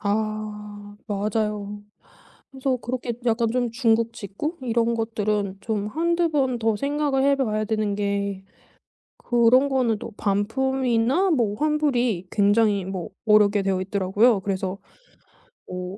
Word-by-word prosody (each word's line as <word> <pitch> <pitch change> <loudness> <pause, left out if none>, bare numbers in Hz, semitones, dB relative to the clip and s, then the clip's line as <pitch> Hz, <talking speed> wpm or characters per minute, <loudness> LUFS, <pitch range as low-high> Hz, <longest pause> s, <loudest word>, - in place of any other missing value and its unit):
아 210 -1 -4
맞아요. 210 0 -2 0.7
그래서 265 -1 -1
그렇게 245 0 -4
약간 230 0 +2
좀 245 -1 0
중국 230 -2 +2
직구 230 - -5
이런 235 -1 +1
것들은 210 -3 -1
좀 210 -1 -2
1-2 335 +6 +1
번 265 -5 +1
더 225 -2 +1
생각을 280 0 0
해 280 0 +4
봐야 215 -5 0
되는 215 -1 -1
게 200 -1 -2 0.7
그런 245 +3 +4
거는 245 -5 +1
또 225 - -8
반품이나 250 - +1
뭐 230 -9 +1
환불이 250 - 0
굉장히 205 -1 +3
뭐 185 -2 -5 0.2
어렵게 210 -1 +5
되어있더라고요. 195 +3 +2
그래서 190 0 -3 0.9
뭐 180 +1 -6
220 Hz, 245 characters per minute, -24 LUFS, 205-255 Hz, 0.9 s, 어렵게